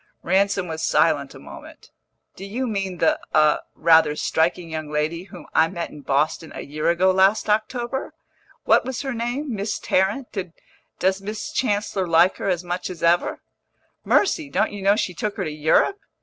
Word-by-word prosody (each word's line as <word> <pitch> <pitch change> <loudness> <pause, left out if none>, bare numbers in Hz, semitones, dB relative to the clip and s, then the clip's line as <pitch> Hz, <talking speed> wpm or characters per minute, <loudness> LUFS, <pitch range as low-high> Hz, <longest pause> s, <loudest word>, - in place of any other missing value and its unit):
Ransom 195 +1 +1
was 160 -1 -5
silent - - +1
a - - -11
moment. - - -13 0.4
"Do - - -10
you 230 +7 -3
mean 195 -5 -3
the 160 - +2 0.2
a 155 -1 +4 0.2
rather 160 -2 +4
striking 165 +2 0
young 155 -1 -4
lady 155 +4 -2
whom - - -12
I 160 - +4
met 170 0 -5
in 150 - -11
Boston 150 +4 -1
a - - -5
year 150 +3 -2
ago 180 +2 +3
last 190 +3 +3
October? 240 +7 -1 0.5
What - - +4
was 260 +1 -4
her 270 -2 -3
name? 240 +4 -3
Miss 205 +1 -2
Tarrant? 205 +8 -1 0.6
Does 190 +1 +1
Miss 210 +2 -5
Chancellor 205 -5 -1
like 170 +3 +4
her - - -2
as 180 -1 -1
much 175 +1 -4
as 180 -3 -8
ever?" 170 +1 +2 0.6
"Mercy! 325 -7 +2
don't 215 - 0
you 205 - -6
know 200 +1 +4
she 185 -4 -2
took 210 +1 -4
her 195 - -1
to 155 - -3
Europe? 155 - +2
190 Hz, 175 wpm, -23 LUFS, 165-215 Hz, 0.6 s, a